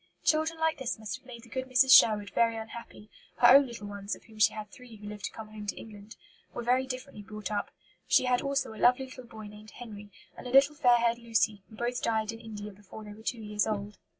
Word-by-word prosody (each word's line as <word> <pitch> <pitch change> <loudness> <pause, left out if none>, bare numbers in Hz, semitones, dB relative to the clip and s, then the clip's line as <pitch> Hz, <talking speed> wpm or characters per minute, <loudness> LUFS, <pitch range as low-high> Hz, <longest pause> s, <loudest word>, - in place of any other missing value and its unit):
Children 315 +1 +1
like 320 -1 +1
this 260 -2 -3
must 220 +2 -5
have 260 - -24
made 235 -2 -10
the 235 - -16
good 260 +2 -4
Mrs. 255 0 +7
Sherwood 205 -2 +5
very 230 -1 +2
unhappy; 225 -1 -9 0.3
her 240 - +6
own 275 +2 +8
little 235 -3 -8
ones 205 0 -5
of - - -18
whom 220 -1 -16
she - - +6
had 210 -1 -8
three 250 -4 -13
who 210 -1 -13
lived 210 -1 -6
to - - -4
come 220 -1 -9
home 215 -1 -9
to - - -2
England 210 0 -12 0.4
were 240 - -4
very 255 +2 +2
differently 255 -3 -7
brought 210 0 -7
up. 205 - -2 0.4
She - - +4
had 250 -1 +2
also 275 -4 -1
a 220 - -10
lovely 250 +2 +4
little 255 -1 -11
boy 220 -2 -10
named 210 +1 -12
Henry, 210 -4 -10 0.3
and - - -9
a - - -6
little 275 +3 +6
fair 250 -5 +4
haired 235 0 +1
Lucy, 225 -3 0
who 220 - -13
both 240 +2 -2
died 220 -1 0
in 225 - -10
India 210 -2 -8
before 205 +2 -12
they 210 -1 -9
were 215 - -14
two 225 0 -4
years 210 0 -1
old. 205 -1 -4
225 Hz, 250 wpm, -29 LUFS, 210-250 Hz, 0.4 s, own